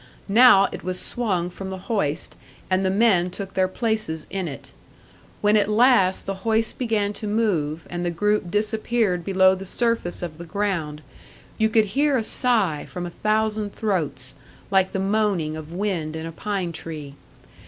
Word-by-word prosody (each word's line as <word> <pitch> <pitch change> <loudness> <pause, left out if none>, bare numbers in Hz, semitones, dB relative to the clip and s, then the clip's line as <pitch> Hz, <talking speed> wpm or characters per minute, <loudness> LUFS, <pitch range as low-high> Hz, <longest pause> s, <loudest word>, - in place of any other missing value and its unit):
Now 215 -2 +7
it - - -7
was 185 +1 -2
swung 185 -7 -1
from 190 +2 -7
the 190 - -5
hoist, 175 -10 -1 0.4
and 185 +1 +2
the 190 - +2
men 190 -3 +3
took 195 +1 -7
their 185 0 +2
places 215 -6 -2
in 190 -3 -2
it. 140 - -9 0.7
When 210 0 +4
at 205 -1 +3
last 215 -4 +4
the 195 - -2
hoist 225 +1 0
began 215 -5 0
to 210 - -6
move, 170 -8 0
and 175 0 -4
the 175 - 0
group 210 +2 0
disappeared 215 -2 0
below 190 0 +4
the 190 0 -5
surface 230 -3 0
of 165 -2 -6
the 170 - -7
ground, 165 -6 -2 0.6
you 220 0 +3
could 220 -1 +4
hear 285 0 +3
a 230 - -1
sigh 215 - 0
from 180 -1 -5
a 175 - -6
thousand 215 +1 -1
throats, 155 - -2 0.4
like 190 -1 +3
the - - -2
moaning 195 -5 0
of 155 0 -8
wind 175 -4 -2
in 160 0 -5
a 165 - -5
pine 190 0 -3
tree. 155 -4 -7
195 Hz, 175 wpm, -23 LUFS, 175-215 Hz, 0.7 s, Now